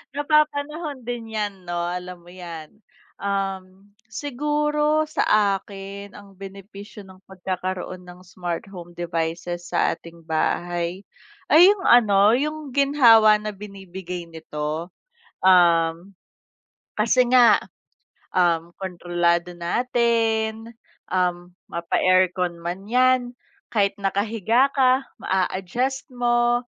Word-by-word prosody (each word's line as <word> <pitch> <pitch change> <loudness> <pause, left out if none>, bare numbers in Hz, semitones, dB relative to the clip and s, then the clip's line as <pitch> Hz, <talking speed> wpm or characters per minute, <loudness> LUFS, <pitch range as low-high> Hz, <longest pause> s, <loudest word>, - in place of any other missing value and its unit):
Napapanahon 300 -2 0
din 230 -2 -5
yan 205 -3 -4
no 175 0 -4
alam 180 0 -6
mo 170 - -22
'yan, 170 -3 -9 0.4
um, 195 -1 -4 0.2
siguro 300 +4 0
sa 210 -9 +2
akin 200 0 -9
ang 200 -1 -15
benepisyo 195 +1 -11
ng 190 0 -17
pagkakaroon 185 -1 -5
ng 180 0 -13
smart 175 -1 -5
home 175 -3 -10
devices 175 +1 -4
sa - - +1
ating 170 -1 -15
bahay, 175 +3 -2 0.4
ay 350 +5 +7
'yung 405 -3 -4
ano 210 -2 +5
'yung 300 0 -3
ginhawa 230 -7 +6
na 210 -1 -6
binibigay 190 -3 -8
nito. 160 +1 -5 0.5
Um, 175 0 +3 0.8
kasi 240 +3 +2
nga 245 -2 +6 0.7
um 170 -2 +1
kontrolado 175 -1 -1
natin, 225 +3 0 0.4
um 180 -1 -1 0.2
mapa-aircon 180 +1 +1
man 185 +4 -5
yan 250 0 +2 0.4
kahit 200 -2 +1
nakahiga 220 +6 +1
ka 260 -1 +3 0.2
maa-adjust 190 +8 -2
mo, 240 0 +2
195 Hz, 100 wpm, -23 LUFS, 175-240 Hz, 0.8 s, ay